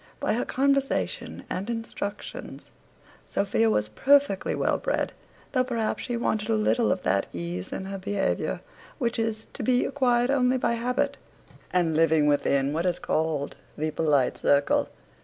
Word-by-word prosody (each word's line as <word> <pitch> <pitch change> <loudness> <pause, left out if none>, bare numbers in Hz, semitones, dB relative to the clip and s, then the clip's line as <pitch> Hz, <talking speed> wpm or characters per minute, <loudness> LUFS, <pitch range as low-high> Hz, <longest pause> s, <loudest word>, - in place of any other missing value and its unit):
By - - +1
her 240 - 0
conversation 275 0 0
and 195 +5 -4
instructions, 225 -3 -6 0.6
Sophia 205 +3 +1
was 105 - +1
perfectly 275 - +3
well - - +1
bred, - - -1 0.4
though 255 -2 +2
perhaps 235 -4 -1
she 240 -1 -2
wanted 220 -2 -1
a 225 - +3
little 225 +2 +2
of 185 - -1
that 100 - +1
ease 85 +1 -4
in 190 - -4
her 195 0 -5
behaviour 200 0 -1 0.4
which 235 -4 -1
is 220 -1 -1
to - - -6
be 250 +2 +2
acquired 250 -2 +2
only 255 -2 +3
by 240 - +1
habit, 245 +3 0 0.5
and 170 -3 +2
living 160 -1 +4
within 140 -1 +2
what 165 +3 0
is 175 -1 +1
called 155 -3 -1 0.2
the 155 +1 -1
polite 145 -5 +1
circle. 140 0 +3
210 Hz, 155 wpm, -26 LUFS, 160-245 Hz, 0.6 s, living